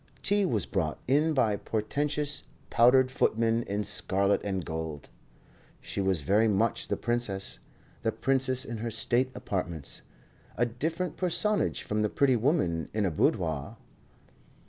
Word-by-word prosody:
Tea 205 -1 +2
was 110 - 0
brought 80 -2 -1
in 150 +4 +3
by 110 -6 +3
portentous, 145 +8 -2 0.3
powdered 130 +2 +5
footmen 115 -1 +1
in 105 -2 -2
scarlet 100 0 +2
and 95 -3 -2
gold. 80 -2 -5 0.7
She - - -4
was 95 -4 +1
very 105 +9 +3
much 110 +2 +1
the - - -1
princess; 120 -5 -2 0.4
the - - 0
princess 130 0 +1
in 120 - -5
her 115 +2 -3
state 120 +3 +1
apartments, 85 -6 -4 0.6
a 120 - +3
different 160 +9 -3
personage 205 +4 +1
from 105 0 -1
the 105 - +1
pretty 135 +1 +3
woman 110 - 0
in 105 -2 +1
a 90 - 0
boudoir. 80 -2 0
115 Hz, 140 wpm, -29 LUFS, 95-135 Hz, 0.7 s, powdered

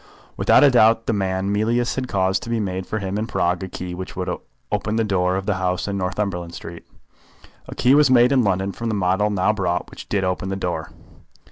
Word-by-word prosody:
Without - - +4
a 140 - +7
doubt 115 -2 +4
the - - 0
man 95 0 -1
Mealyus 115 +3 +1
had 130 -1 -3
caused 95 -3 0
to - - -8
be 115 -1 0
made 95 -3 -3
for 110 - -2
him 100 0 -3
in 110 - -2
Prague 90 -6 0
a 95 - -4
key 90 0 -6
which 90 +1 -7
would 90 0 -3 0.4
open 105 +1 -1
the 115 - +2
door 95 -3 +1
of 95 0 -3
the 100 -2 0
house 90 +1 -1
in 100 - -2
Northumberland 90 -2 -3
Street. 85 0 -9 0.8
A - - -8
key 125 - +3
was 145 -1 +5
made 125 0 +5
in 130 -3 +4
London 95 -1 0
from 115 +3 -4
the 110 - -1
model 95 +2 +1
now 105 +1 +1
brought 90 -4 -2
which - - -11
did 100 -2 0
open 95 +1 -2
the 95 - -2
door. 85 -5 -3
95 Hz, 230 wpm, -22 LUFS, 90-110 Hz, 0.8 s, a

